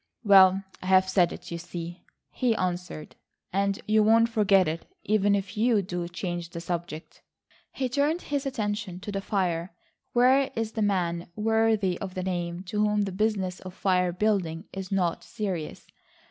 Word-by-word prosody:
"Well, 195 -2 +6 0.2
I've 185 0 +4
said 185 -2 +3
it, - - -9
you 170 - -4
see," 175 0 -7 0.3
he 245 -3 +1
answered, 180 -4 -4 0.4
"and 200 0 +1
you 215 0 +4
won't 225 +2 +5
forget 200 -5 +4
it, 160 +2 -4 0.2
even 205 -1 +2
if 195 +1 -4
you 220 -1 +2
do 175 -1 -4
change 175 -1 -4
the 170 - -7
subject." 170 -2 -5 0.5
He 265 - -2
turned 290 +7 0
his 285 -1 -2
attention 210 -7 -3
to 205 - -5
the 195 -1 -2
fire. 180 -4 -1 0.4
Where 260 +3 +4
is 225 -1 -2
the 225 - -3
man, 175 -4 0
worthy 220 -4 +1
of 190 -2 -5
the 185 - -2
name 175 -1 -3
to 200 +3 -4
whom 210 0 +2
the 195 - -3
business 190 -2 -1
of 185 -1 -10
fire 180 -2 +1
building 180 -4 0
is 190 -1 -6
not 180 -4 0
serious? 185 -7 -5
195 Hz, 165 wpm, -27 LUFS, 175-215 Hz, 0.5 s, Well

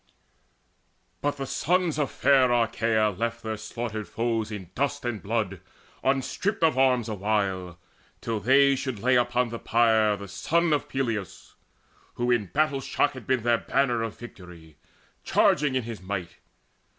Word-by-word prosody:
But 145 0 -1
the 135 - -3
sons 175 +2 0
Of 145 - 0
fair 130 -3 +3
Achaea 115 -2 +2
left 115 +4 -3
their 110 -1 -3
slaughtered 110 0 -5
foes 115 -2 -2
In 95 -4 -7
dust 140 0 -2
and 120 -4 -3
blood 100 -4 -2 0.4
unstripped 135 +9 0
of 160 -4 +4
arms 130 -3 +3
awhile 100 -4 -1 0.4
Till 115 -2 -3
they 135 +5 +4
should 130 -3 -4
lay 125 +5 +2
upon 120 0 +2
the 115 0 -6
pyre 110 -2 +3
the 100 +1 -8
son 170 - +1
Of 145 - -1
Peleus, 115 -8 -3 0.6
who 120 0 0
in 115 -5 +1
battle 145 - 0
shock 145 - +1
had 130 -2 -11
been 130 -3 +1
Their 120 -1 +3
banner 125 -4 +1
of 115 -2 -4
victory, 90 -9 -12 0.5
charging 145 -2 +2
in 130 - 0
his 115 -4 -7
might. 95 -2 -5
115 Hz, 150 wpm, -26 LUFS, 105-135 Hz, 0.6 s, of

